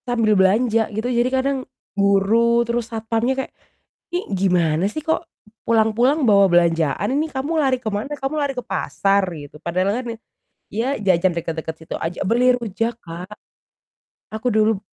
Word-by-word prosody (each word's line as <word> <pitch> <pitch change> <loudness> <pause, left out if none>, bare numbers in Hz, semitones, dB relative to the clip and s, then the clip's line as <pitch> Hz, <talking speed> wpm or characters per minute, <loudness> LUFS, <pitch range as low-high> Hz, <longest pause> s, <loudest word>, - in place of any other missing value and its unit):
Sambil 230 -3 +2
belanja 220 +4 +3
gitu. 220 +2 -3
Jadi 240 +1 +2
kadang 265 +1 0 0.4
guru 210 +4 +3
terus 235 0 -2
satpamnya 225 +2 -1
kayak, - - -19 0.6
"Ini 350 - 0 0.2
gimana 175 -3 +2
sih 310 - -4
kok, 320 +2 -1 0.4
pulang-pulang 230 +6 +2
bawa 200 -1 +6
belanjaan? 170 +1 +2
Ini 305 +2 +1
kamu 270 +4 -3
lari 270 -4 +2
ke 230 - -4
mana? 215 +7 -3
Kamu 280 +1 -3
lari 285 -2 0
ke 255 - -4
pasar?" 200 -4 +1
Gitu. 150 -2 -10
Padahal 190 +8 0
kan, - - -11 0.7
ya 245 +6 -1
jajan 185 -3 +2
dekat-dekat 160 -1 -4
situ 160 0 -9
aja. 165 +3 -3
Beli 245 +5 +3
rujak, 225 0 -3
Kak. 180 +5 -8 1.0
Aku 220 +3 -2
dulu 215 -2 +2
220 Hz, 155 wpm, -21 LUFS, 190-245 Hz, 1.0 s, bawa